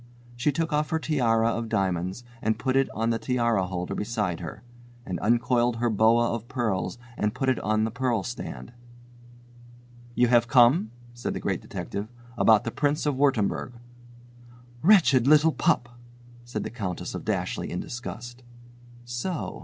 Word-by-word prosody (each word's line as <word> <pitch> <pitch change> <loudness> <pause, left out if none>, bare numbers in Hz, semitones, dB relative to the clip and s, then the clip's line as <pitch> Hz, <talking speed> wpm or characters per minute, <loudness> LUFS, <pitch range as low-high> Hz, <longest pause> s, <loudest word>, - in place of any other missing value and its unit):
She 120 +5 +1
took 160 +2 -2
off 150 0 +1
her 160 - +1
tiara 115 -8 +2
of 115 -1 -3
diamonds 95 0 -1 0.2
and 110 0 0
put 130 +2 -1
it 135 0 +3
on 115 +2 -1
the 115 - -1
tiara 115 -7 +1
holder 90 -1 -4
beside 105 -5 -2
her 90 +6 -8 0.4
and 90 -2 -4
uncoiled 120 +1 +2
her 120 0 0
boa 115 +3 +3
of 115 0 -5
pearls 110 -7 -2 0.2
and 105 +2 -1
put 130 0 0
it 130 - +1
on 110 +1 +1
the 110 - -1
pearl 125 -3 0
stand. 125 0 -7 1.4
"You 125 - +4
have 120 -1 +4
come," 120 0 +5 0.2
said 120 - -4
the - - -3
Great - - -2
Detective, 100 +1 -5 0.3
"about 110 -2 +5
the 115 - -3
Prince 150 +3 0
of 145 - +2
Wurttemberg." 130 -4 +1 1.1
"Wretched 150 - +5
little 155 +2 +6
pup!" 120 - +1 0.6
said 120 - -4
the - - -5
Countess 100 -7 -4
of - - -5
Dashleigh - - -2
in - - -3
disgust. 120 +1 -7 0.6
So! 120 +8 -4
120 Hz, 160 wpm, -26 LUFS, 110-130 Hz, 1.4 s, little